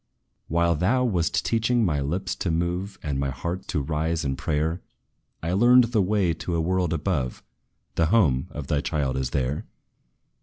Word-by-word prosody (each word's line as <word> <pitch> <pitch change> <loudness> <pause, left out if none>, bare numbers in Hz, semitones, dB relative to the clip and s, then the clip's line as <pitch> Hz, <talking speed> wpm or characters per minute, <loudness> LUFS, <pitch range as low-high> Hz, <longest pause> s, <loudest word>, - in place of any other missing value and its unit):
"While 85 +1 +2
thou 105 +11 +2
wast 90 -10 0
teaching 115 0 +2
my 75 -6 0
lips 80 +7 -2
to 90 - -2
move, 90 +4 -1
And 70 -3 -2
my 70 0 0
heart 85 +8 -4
to 75 - -1
rise 80 +2 -1
in 70 -1 -1
prayer, 80 +4 -1 0.6
I 85 +2 -1
learned 120 +3 +5
the 110 - +4
way 95 -3 +2
to 85 +2 -4
a - - +1
world 90 0 0
above; 75 -6 -2 0.5
The 80 - +2
home 80 - +3
of 75 -2 -6
thy 70 +1 0
child 70 -5 -1
is 65 -1 -1
there! 70 +1 -1
85 Hz, 175 wpm, -25 LUFS, 75-95 Hz, 0.6 s, learned